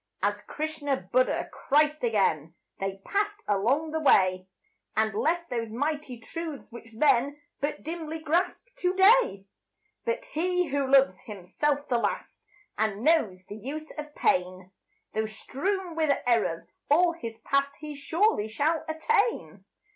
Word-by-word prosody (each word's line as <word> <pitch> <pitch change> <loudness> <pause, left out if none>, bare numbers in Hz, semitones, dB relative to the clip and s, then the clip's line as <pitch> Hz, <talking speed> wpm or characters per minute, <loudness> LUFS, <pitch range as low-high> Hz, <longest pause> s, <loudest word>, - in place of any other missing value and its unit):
As 205 +1 +1
Krishna, 295 +3 -2
Buddha, - - +1
Christ 300 +1 +2
again, 175 -8 +1 0.2
They 195 0 -4
passed 415 +1 -1
along 250 +11 +1
the 320 - -1
way, 185 -10 +4 0.5
And 220 -1 +2
left 335 +9 0
those 230 -2 -2
mighty 285 +1 -3
truths 315 +4 -7
which 230 -1 -11
men 275 +3 +2 0.2
But 290 +2 -3
dimly 320 0 -4
grasp 335 +7 0
to 360 +1 0
day. 385 - +5 0.6
But - - -2
he 360 -4 0
who 280 -1 0
loves 270 -9 +4
himself 280 +9 -2
the 240 -2 +1
last 450 - -3 0.3
And 215 0 0
knows 215 - +2
the 205 - -8
use 300 +7 -6
of 300 -1 -8
pain, 185 +1 0 0.4
Though 220 0 0
strewn 350 - -3
with 310 -3 +2
errors 225 -9 +1 0.2
all 340 +4 +5
his 230 -9 -7
past, 275 +4 0
He 300 -1 -7
surely 305 - +1
shall 295 +9 0
attain. 410 +9 0
285 Hz, 140 wpm, -27 LUFS, 220-320 Hz, 0.6 s, day